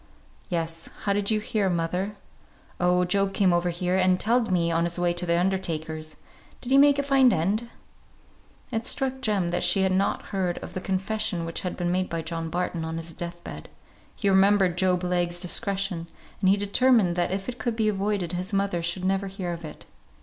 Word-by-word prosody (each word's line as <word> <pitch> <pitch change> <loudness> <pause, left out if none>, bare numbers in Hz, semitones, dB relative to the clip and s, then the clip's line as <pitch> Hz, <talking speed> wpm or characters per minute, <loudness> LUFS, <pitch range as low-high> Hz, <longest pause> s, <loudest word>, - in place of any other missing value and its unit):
"Yes. 165 -2 -3
How 200 - +1
did 200 0 0
you 215 -1 +2
hear, 210 -2 0
mother?" 180 +4 -1 0.6
"Oh, 180 0 +3
Job 195 +1 0
came 190 -3 +3
over 175 +1 +1
here 180 +1 -1
and 185 -1 +3
telled 230 0 +2
me, 170 -2 +2
on 165 +1 +1
his 170 +1 0
way 175 0 +1
to 175 +1 -3
the 170 0 +2
undertaker's. 160 -4 -2 0.4
Did 250 - -6
he 270 - +6
make 285 0 +6
a 280 - +1
fine 270 -3 +5
end?" 210 +8 0 1.0
It 225 +1 -1
struck 265 -1 0
Jem 205 -7 +1
that 175 +1 -1
she 195 - +3
had 190 - +2
not 190 +2 +1
heard 185 -3 0
of - - -8
the 185 - -4
confession 195 -1 -1
which 165 - -3
had 180 - -4
been 175 -1 -1
made 185 +1 0
by 165 -1 -3
John 165 0 -4
Barton 175 -1 -2
on 160 0 -4
his 165 0 -5
death 175 0 -7
bed; - - -8 0.5
he 200 - -2
remembered 195 -2 +4
Job 180 0 +1
Legh's 175 -1 0
discretion, 190 -1 -1 0.3
and 190 - +3
he 195 - +5
determined 205 -2 +3
that 175 -1 +1
if 190 +1 -3
it 250 0 -5
could 240 -2 -1
be 220 -1 +1
avoided 200 -3 -1
his 185 +3 -3
mother 195 -3 0
should 170 +2 -2
never 195 +1 0
hear 190 -2 -4
of 170 0 -8
it. 155 -1 -9
185 Hz, 205 wpm, -26 LUFS, 175-200 Hz, 1.0 s, he